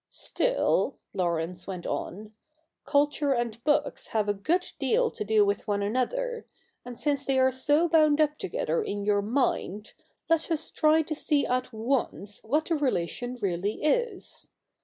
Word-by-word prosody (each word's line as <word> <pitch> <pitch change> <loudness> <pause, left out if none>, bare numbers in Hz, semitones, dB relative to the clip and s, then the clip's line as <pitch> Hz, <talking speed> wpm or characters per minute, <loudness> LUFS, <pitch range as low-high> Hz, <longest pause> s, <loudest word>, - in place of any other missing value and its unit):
' - - -62
Still,' - - 0 0.2
Laurence 175 0 -2
went 185 -3 -6
on, 210 +3 -5 0.3
' 315 0 -49
culture 290 0 +2
and 235 -2 -3
books 295 0 0
have 215 -2 0
a 205 - +2
good 335 - 0
deal 470 +1 +2
to - - -4
do 210 0 +4
with 200 +3 -1
one 205 -1 0
another; 465 - -1 0.4
and 245 -1 -9
since 285 -2 0
they 270 -1 +1
are 260 0 +4
so 290 +6 +2
bound 310 -2 +4
up 300 0 +2
together 465 +3 -1
in 205 - -3
your 205 -1 +3
mind, 215 -3 -1 0.3
let 330 -1 +1
us 325 -2 -2
try 315 +1 +3
to 310 - -4
see 295 -1 +1
at 255 0 -1
once 220 -3 -2
what 295 +8 +1
the 335 - 0
relation 245 - -1
really 195 +5 -1
is. 445 +4 -1
260 Hz, 165 wpm, -27 LUFS, 210-310 Hz, 0.4 s, do